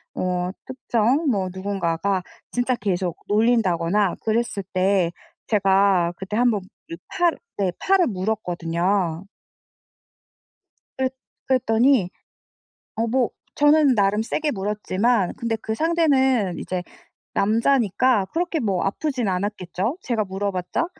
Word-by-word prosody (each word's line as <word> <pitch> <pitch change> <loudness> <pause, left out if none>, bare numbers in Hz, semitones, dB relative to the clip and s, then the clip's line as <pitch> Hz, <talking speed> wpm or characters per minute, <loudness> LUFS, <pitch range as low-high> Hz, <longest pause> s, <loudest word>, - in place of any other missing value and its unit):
어 180 0 -1 0.2
특정 260 +3 0
뭐 195 -3 0
누군가가 190 -1 -1 0.3
진짜 245 +1 0
계속 180 -6 -2
놀린다거나 205 -4 +2
그랬을 220 -2 -1
때 185 -2 +2 0.4
제가 195 -4 +3
그때 190 +2 -5
1 245 0 +4
번 210 - 0 0.3
요 - - -3
팔을 350 -3 +1 0.2
네 190 -3 +1
팔을 380 -2 +3
물었거든요. 180 -3 -1 1.7
그랬 260 0 0 0.3
그랬더니 245 -4 +3 0.9
어 225 +1 0
뭐 245 +1 +1 0.2
저는 295 -2 +5
나름 205 0 +2
세게 300 +6 -1
물었지만 205 +1 0
근데 230 -1 -2
그 220 0 -4
상대는 265 - +2
이제 185 -1 -3 0.5
남자니까 230 0 +2
그렇게 340 -1 -1
뭐 195 -7 0
아프진 250 +2 -1
않았겠죠, 190 - -2
제가 230 -4 -1
물어봤자. 190 - -2
210 Hz, 240 characters per minute, -23 LUFS, 185-245 Hz, 1.7 s, 저는